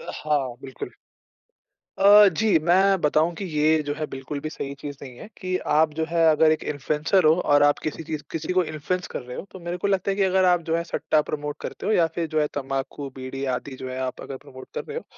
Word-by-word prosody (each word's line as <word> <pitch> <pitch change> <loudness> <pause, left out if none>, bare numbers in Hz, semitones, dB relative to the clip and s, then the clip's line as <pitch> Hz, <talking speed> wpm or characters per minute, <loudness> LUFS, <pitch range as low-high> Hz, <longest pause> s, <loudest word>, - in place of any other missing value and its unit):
हाँ, 140 -5 -1
बिल्कुल। 130 -3 -7 1.1
अ, 205 +1 +8
जी। 200 +1 +3
मैं 190 +4 +3
बताऊँ 155 +3 +2
कि 195 - -5
ये 155 -1 +2
जो 145 - 0
है 155 0 -3
बिल्कुल 135 +2 -5
भी 155 - -5
सही 140 -2 -5
चीज़ 145 -1 -7
नहीं 125 -3 -10
है। - - -10
कि 185 0 -2 0.2
आप 155 0 +3
जो 160 - +1
है 165 -1 +3
अगर 155 +1 +4
एक 155 - 0
इन्फ़्लुएंसर 150 +6 0
हो 155 - +7
और 145 -4 +4
आप 145 0 +4
किसी 155 +1 -4
चीज़ 155 -2 -5
किसी 165 +3 -3
को 185 -1 +3
इन्फ्लुएंस 155 +4 -3
कर - - -4
रहे 125 0 -8
हो - - -6
तो 190 - -10
मेरे 175 +1 -4
को 200 - -1
लगता 195 0 +1
है 195 - -1
कि 195 - +3
अगर 190 0 +3
आप 180 -1 +4
जो 165 - +2
है 170 - -1
सट्टा 155 -2 +1
प्रमोट 150 0 -3
करते - - -6
हो 215 - +1
या 170 -5 +4
फिर 170 -2 -1
जो 155 0 0
है 150 - +1
तम्बाकू, 135 0 -4
बीड़ी 130 +1 -6
आदि 130 +2 -5
जो 130 0 -7
है 130 - -5
आप 130 -1 -4
अगर 135 - -7
प्रमोट 130 0 -13
कर - - -3
रहे 455 +1 -6
हो - - -5
155 Hz, 250 wpm, -24 LUFS, 145-180 Hz, 1.1 s, अ